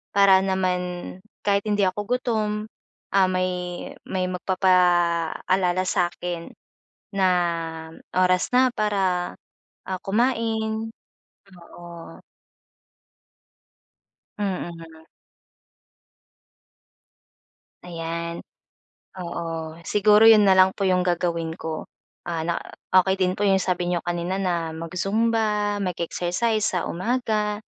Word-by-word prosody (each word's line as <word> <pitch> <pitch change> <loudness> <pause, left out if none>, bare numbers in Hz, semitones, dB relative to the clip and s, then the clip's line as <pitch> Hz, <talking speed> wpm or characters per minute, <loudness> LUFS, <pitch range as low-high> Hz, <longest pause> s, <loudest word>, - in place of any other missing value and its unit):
para 200 -1 +7
naman 180 -1 -2 0.3
kahit 200 -1 +2
hindi 205 -1 +2
ako 185 +3 -2 0.2
gutom, 220 -4 -1 0.7
ah, 190 -1 +5
may 180 -1 -2 0.2
may 185 -1 -1
magpapaalala 180 0 +2
sa'kin 175 -2 -2 0.7
na 190 -1 +3 0.9
oras 185 0 +3
na 255 0 +4
para, 190 -4 0 0.5
ah, 185 -1 -3
kumain. 225 0 0 0.9
Oo. 170 -1 -11 2.2
Mm. 165 -5 -5 2.8
Ayan. 170 0 -5 0.8
Oo, 165 -2 -5
siguro 210 +1 +4
yun 215 -2 +8
na 190 - +6
lang 185 0 +7
po - - -5
yung 180 -1 +3
gagawin 170 -2 -1
ko. 160 -1 -5 0.4
Ah, 165 -2 -2
na 170 - 0 0.4
okey 190 +1 +1
din 185 -1 +2
po 205 - -1
yung 190 0 +4
sabi 180 -1 -1
n'yo 175 -1 -1
kanina 175 +2 -2
na 170 -4 -1
mag-zumba, 210 +4 0
mag-exercise 180 +5 -1
sa 180 -5 0
umaga, 210 +1 -1
185 Hz, 95 wpm, -24 LUFS, 175-205 Hz, 2.8 s, yun